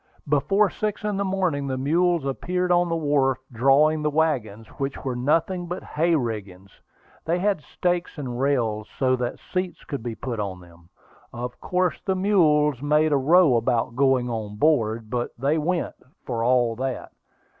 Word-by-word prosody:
Before 160 +8 +2
six 215 0 -3
in 210 -2 -1
the 200 - 0
morning, 185 -8 -1
the 130 -1 -2
mules 165 +3 +1
appeared 180 +6 -1
on 175 0 +3
the 165 - 0
wharf, 145 -5 +1
drawing 140 +6 +3
the 150 - +1
wagons, 130 -9 -1
which 135 0 -3
were 130 -2 -2
nothing 165 +8 0
but 180 +2 -5
"hay 165 +2 +1
riggings." 100 - -4 0.5
They 170 +2 +1
had 195 -2 0
stakes 175 +2 -2
and 125 -4 -5
rails, 115 -6 0
so 130 -1 +2
that 120 -1 -3
seats 185 -2 -4
could 140 -4 -5
be 115 -1 -5
put 120 -2 -5
on 95 -3 -4
them. 85 -1 -18 0.4
Of 120 +1 -6
course 180 -1 0
the 190 - 0
mules 150 - +3
made 150 +2 +2
a 145 - +4
row 155 0 +5
about 115 0 0
going 130 -2 +2
on 110 -3 -4
board; 115 -5 +1
but 120 -1 -3
they 140 +6 +1
went, 170 +3 -1 0.3
for 115 -2 -2
all 120 -1 +2
that. 130 0 -4
140 Hz, 170 wpm, -24 LUFS, 120-170 Hz, 0.5 s, row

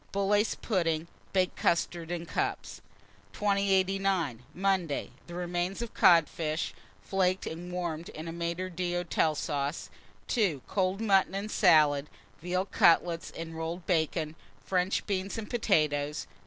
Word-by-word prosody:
Bullace 205 +2 +2
pudding, 165 -6 0 0.2
baked 185 -1 +1
custards 170 0 0
in 170 -1 -3
cups. - - -3 0.5
2089. 195 - +1
Monday. 185 -5 +1
1. - - -16 0.2
The 175 - -9
remains 180 +4 -2
of 235 - -7
codfish, 160 -1 +3 0.3
flaked, 185 -1 +1
and 175 +2 -6
warmed 170 -2 -3
in 155 +2 -8
a 165 - -5
maître 170 +2 -3
d'hôtel 175 -3 0
sauce. 145 -1 -3 0.3
2. 190 - 0
Cold 190 +1 0
mutton 195 -3 +3
and 205 +2 -3
salad, 150 -6 +4 0.3
veal 180 +2 -1
cutlets 170 -2 +3
and 165 0 -7
rolled 165 +2 -4
bacon, 160 -3 0 0.3
French 185 0 0
beans 195 +1 -2
and 220 -2 -5
potatoes. 150 - +1
175 Hz, 130 wpm, -29 LUFS, 165-195 Hz, 0.5 s, salad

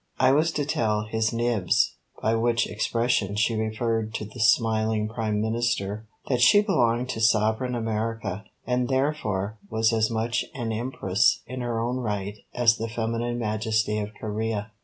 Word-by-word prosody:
I 130 - +5
was 155 +4 +3
to 145 - -1
tell 110 -7 0
"His 110 0 -1
Nibs," 115 -6 +1 0.3
by 110 - +2
which 120 +1 +2
expression 110 -1 0
she 105 +2 +2
referred 110 0 -1
to 105 - -3
the 110 +4 -11
smiling 110 0 +2
Prime 110 -2 -2
Minister, 110 -2 -1 0.2
that 125 -3 +1
she 205 +12 +7
belonged 120 - +1
to 110 - -3
sovereign 110 +3 +2
America, 110 -3 -3 0.2
and 125 0 0
therefore 110 -7 -1
was 110 +1 +2
as 110 -1 +2
much 115 +1 -1
an 120 -4 -3
Empress 110 -4 +1
in 130 +1 -6
her 120 -2 -2
own 120 +2 -1
right 105 -3 -3
as 115 -2 +3
the 115 +1 -3
feminine 115 +1 -2
Majesty 110 -1 0
of 105 0 -3
Corea. 110 0 -3
110 Hz, 160 wpm, -25 LUFS, 110-120 Hz, 0.3 s, she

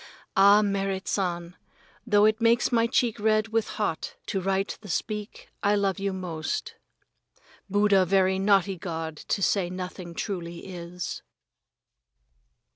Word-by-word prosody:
Ah, 200 +2 +7
Merrit 195 -1 -1
San, 175 -2 -2 0.5
though 205 -1 +5
it 215 +1 +2
makes 235 +2 +3
my 230 -1 +3
cheek 235 -2 +1
red 215 +1 +2
with 225 0 0
hot 205 -7 -2
to 195 - -2
write 195 +1 -1
the 205 - -11
speak, 210 +4 -4
I 205 0 +3
love 200 -1 0
you 195 0 -1
most. 180 - -4 1.0
Buddha 205 -1 +4
very 190 0 +3
naughty 195 -1 +3
old 175 - -12
god 160 -3 -4
to 195 - -2
say 185 -3 +2
nothing 180 -1 -6
truly 175 -4 -5
is. 180 -1 -6
195 Hz, 135 wpm, -26 LUFS, 180-210 Hz, 1.0 s, Ah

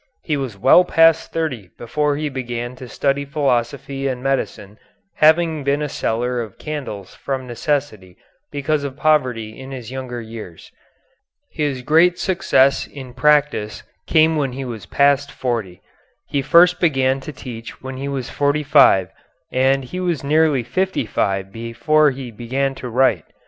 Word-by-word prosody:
He 155 - -1
was 130 -7 -4
well 135 - +6
past 165 -2 +3
thirty 130 - -3
before 145 +4 -1
he 155 0 -2
began 120 -2 -5
to 130 - -9
study 140 +2 0
philosophy 135 -1 -1
and 125 -1 -3
medicine, 110 -6 -3 0.4
having 160 -1 +3
been 140 +2 0
a - - -1
seller 120 0 -1
of 110 -4 -8
candles 120 -11 -6
from 130 -1 -4
necessity 120 -7 -3 0.3
because 145 +1 -1
of 140 -1 -5
poverty 125 -9 0
in 130 0 -9
his 125 -3 -8
younger 130 -2 -5
years. 110 -7 -10 0.8
His 145 -5 -2
great 170 +5 +4
success 140 -8 +2
in 130 -3 -10
practice 145 -5 +1 0.2
came 160 0 +4
when 135 -4 -1
he 135 +1 -5
was 115 -4 -7
past 140 0 +2
forty. 115 -8 -4 0.4
He 140 - -1
first 175 +5 +5
began 135 -5 +2
to 135 - -8
teach 120 -4 -9
when 130 0 -6
he 135 +1 -4
was 135 -3 -3
forty 145 +1 0
five, 135 -11 +5 0.4
and 135 +1 +2
he 180 +9 -6
was 175 -6 -1
nearly 150 -2 +2
fifty 185 +3 -1
five 95 -2 -1
before 115 +8 +2
he 130 -2 -6
began 130 +5 -2
to 125 -2 -7
write. 120 -8 +2
135 Hz, 155 wpm, -20 LUFS, 120-150 Hz, 0.8 s, well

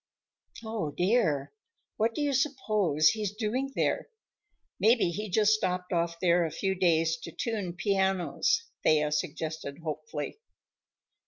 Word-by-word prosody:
"Oh, 220 -8 -2
dear! 175 - +1 0.4
What 225 +1 +1
do - - -2
you 285 -1 +1
suppose 215 - +2
he's 210 -2 -2
doing 250 +5 -2
there? - - 0 0.7
Maybe 225 -5 +4
he 210 +5 -4
just 215 +3 +4
stopped 180 -3 -1
off 170 0 0
there 175 -1 +3
a 165 - -1
few 190 +4 -1
days 165 -3 +2
to 165 - -9
tune 205 -3 -3
pianos," 195 - +1 0.2
Thea 150 -1 +3
suggested 155 -2 -3
hopefully. 150 - -5
180 Hz, 130 wpm, -29 LUFS, 160-215 Hz, 0.7 s, Maybe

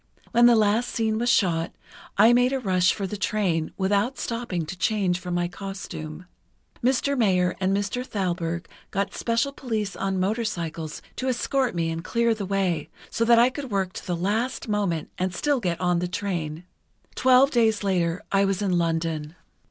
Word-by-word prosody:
When 240 +1 +6
the 240 - +6
last 220 +3 +2
scene 220 -1 0
was 240 +1 +1
shot, 170 -7 +2 0.4
I 220 +4 +7
made 245 +2 +3
a 270 - 0
rush 185 -6 +3
for 200 - -3
the 205 +2 -4
train, 190 -6 0
without 200 +6 +1
stopping 230 -8 -3
to 185 - -6
change 185 -2 +1
from 180 -1 -4
my 175 0 +1
costume. 180 -4 -7 0.6
Mr. 265 +3 +2
Mayer 185 -7 +2
and 190 0 +1
Mr. 205 +5 -2
Thalberg 175 -6 -2 0.2
got 195 0 -2
special 230 +4 0
police 220 -7 -3
on 195 -1 -1
motorcycles 185 -7 -2
to 260 - -2
escort 255 -1 0
me 165 -1 0
and 165 +1 -4
clear 235 +2 +1
the 205 -3 -5
way, 185 -5 0 0.2
so 230 - 0
that 235 0 +6
I 240 +2 +5
could 275 -1 -6
work 190 -3 -1
to - - -8
the 175 -2 -1
last 220 +10 -1
moment 200 -7 -1
and 185 -1 -1
still 290 +6 +1
get 175 -6 -1
the 180 -1 +1
train. 170 -5 -3 0.5
Twelve 260 +2 +5
days 220 -3 +2
later 175 -3 0
I 195 0 +4
was 195 0 0
in 180 -3 +2
London." 165 -2 -1
195 Hz, 175 wpm, -25 LUFS, 175-230 Hz, 0.6 s, I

